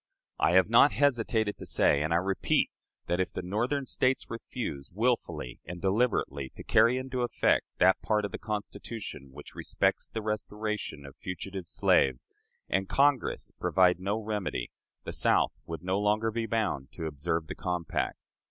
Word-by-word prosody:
"I - - +3
have 95 0 +6
not 120 +6 +6
hesitated 115 -6 +1
to - - -8
say, 70 - +4
and 80 +2 -1
I - - +3
repeat, 95 +2 +1 0.3
that, 90 - -1
if 95 - 0
the - - -5
Northern 120 +9 -1
States 130 0 +1
refuse, 115 - -5
willfully 110 - -1
and 90 +1 -7
deliberately, 95 - 0
to - - -9
carry 120 +2 +4
into 130 -1 -3
effect 120 - +2
that 95 +1 +4
part 105 -1 +1
of 100 - -5
the - - -5
Constitution 105 - -6
which 75 +2 -11
respects - - 0
the 110 - -4
restoration 105 -7 -3
of 70 0 -11
fugitive 90 0 -6
slaves, 65 -5 +2 0.4
and 95 +1 0
Congress 140 -2 +2
provide 90 -1 +3
no 100 +3 -1
remedy, 105 - -3 0.3
the - - -5
South - - +3
would 85 +1 -6
no 95 +2 0
longer 105 +2 +1
be 115 0 -2
bound 105 - -1
to 80 - -5
observe 80 +2 -2
the - - -6
compact. 90 -3 -2
100 Hz, 160 wpm, -29 LUFS, 85-115 Hz, 0.4 s, have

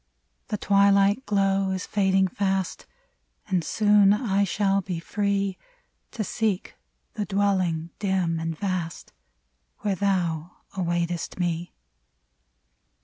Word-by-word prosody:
The 210 - -2
twilight 200 +4 +3
glow 195 -1 +2
is 190 0 -2
fading 190 -1 +2
fast, 190 0 -2 0.6
And 185 -4 0
soon 205 +1 +4
I 200 -2 +1
shall 195 0 +1
be 180 -2 -4
free 200 +1 -1 0.5
To 225 - -2
seek 210 -2 -2 0.4
the 210 - -3
dwelling, 185 -5 0
dim 185 -5 0
and 165 -1 -3
vast, 185 -4 -4 0.7
Where 205 -2 0
thou 180 -4 -1 0.2
awaitest 175 -1 -2
me. 175 -1 -2
195 Hz, 105 wpm, -25 LUFS, 175-200 Hz, 0.7 s, soon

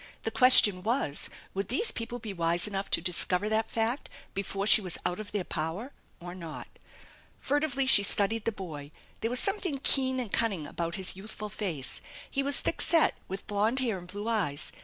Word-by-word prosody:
The - - -2
question 220 -7 +8
was, 220 - -2 0.2
would 195 0 -3
these 280 - 0
people 235 +1 -6
be 220 -4 -7
wise 170 -1 +2
enough 195 -1 -3
to - - +1
discover 180 +2 +1
that 220 +1 0
f - - -12
act 230 +5 -1 0.2
before 195 0 -3
she 215 - +6
was 180 -4 -1
out 180 - -2
of 215 -1 -8
their 205 -3 -2
power 175 - -4 0.3
or 175 0 -8
not? 165 -4 -8 0.7
Furtively 285 -1 -1
she 260 -6 +7
studied 205 +2 +1
the 230 - +1
boy. 160 -8 -8 0.3
There 225 - -2
was 250 +1 +2
something 390 -7 0
keen 260 -1 +4
and 235 -6 -5
cunning 200 -9 0
about 170 +3 -4
his 190 -1 -1
youthful 210 +2 -8
face. 175 -11 -3 0.3
He 275 - -1
was 280 0 +4
thick - - -2
set, 330 -2 +3
with 190 +1 -7
blond 210 +4 0
hair 230 -7 -1
and 175 - -13
blue 205 +4 -7
eyes. 190 -11 -1
205 Hz, 195 wpm, -28 LUFS, 180-240 Hz, 0.7 s, question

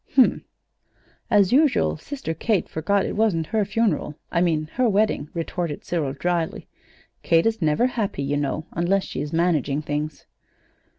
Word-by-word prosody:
"Hm 265 - +9
m; - - -2 0.8
as 205 -4 +4
usual 290 0 +3
Sister 270 - -5
Kate 200 +3 0
forgot 195 +5 0
it - - -3
wasn't 205 -7 +1
her 220 -1 +3
funeral 205 -6 0 0.2
I 170 - +1
mean, 160 -3 +1
her 250 -2 +2
wedding," 200 -7 +1
retorted 170 -2 -3
Cyril, 155 -6 -1
dryly. 170 +3 -2 0.5
"Kate 165 0 +3
is 225 -2 0
never 155 +9 +2
happy, 220 - -2
you 145 +1 0
know, 145 +2 -2
unless 190 +4 +1
she's 145 +2 -5
managing 155 -4 +1
things." 150 +1 -4
170 Hz, 155 wpm, -23 LUFS, 155-210 Hz, 0.8 s, Hm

